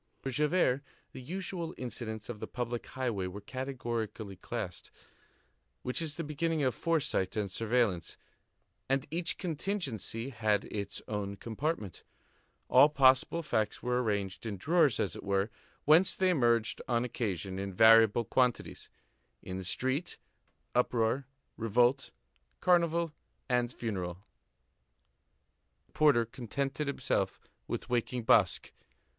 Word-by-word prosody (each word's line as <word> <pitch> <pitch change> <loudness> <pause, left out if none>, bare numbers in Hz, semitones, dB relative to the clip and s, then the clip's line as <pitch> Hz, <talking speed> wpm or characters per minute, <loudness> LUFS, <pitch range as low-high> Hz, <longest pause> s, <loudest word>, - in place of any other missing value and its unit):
For 135 - -5
Javert, 150 -1 +2 0.3
the - - -9
usual 175 +2 -4
incidents 110 -3 -5
of 120 -3 -6
the - - -5
public 120 -1 -4
highway 120 -8 -2
were 95 +3 -7
categorically 115 -4 -4
classed, - - -5 0.9
which 125 +6 0
is 155 -2 -2
the 165 - -3
beginning 155 +1 -1
of 130 -2 +2
foresight 150 - 0
and 100 -3 -1
surveillance, 110 -5 0 0.7
and 135 0 +1
each 170 +1 -1
contingency 150 - -3
had 110 -4 +1
its 100 -1 -5
own 100 -2 -3
compartment; 110 - -3 0.7
all 145 - +7
possible 135 +3 +4
facts 110 -8 -1
were 125 0 +1
arranged 100 -2 -2
in 105 -3 -4
drawers, 155 - +3
as 90 - 0
it - - -7
were, 100 +2 0 0.3
whence 165 +5 +6
they 185 -1 +3
emerged 120 -7 +2
on 120 -1 +1
occasion, 95 -6 -3
in 100 0 -3
variable 115 +2 +6
quantities; 125 +2 0 0.5
in 95 0 -5
the - - -5
street, 130 - -1 0.6
uproar, 125 +2 +1 0.3
revolt, 120 +4 +2 0.5
carnival, 170 -2 +2 0.3
and 125 -1 +1
funeral. 95 -6 -4 1.6
The - - -34
porter 145 -7 +4
contented 135 +5 -3
himself 140 - -1 0.3
with - - -4
waking 120 0 -1
Basque. 110 -6 +3
120 Hz, 125 wpm, -31 LUFS, 105-145 Hz, 1.6 s, all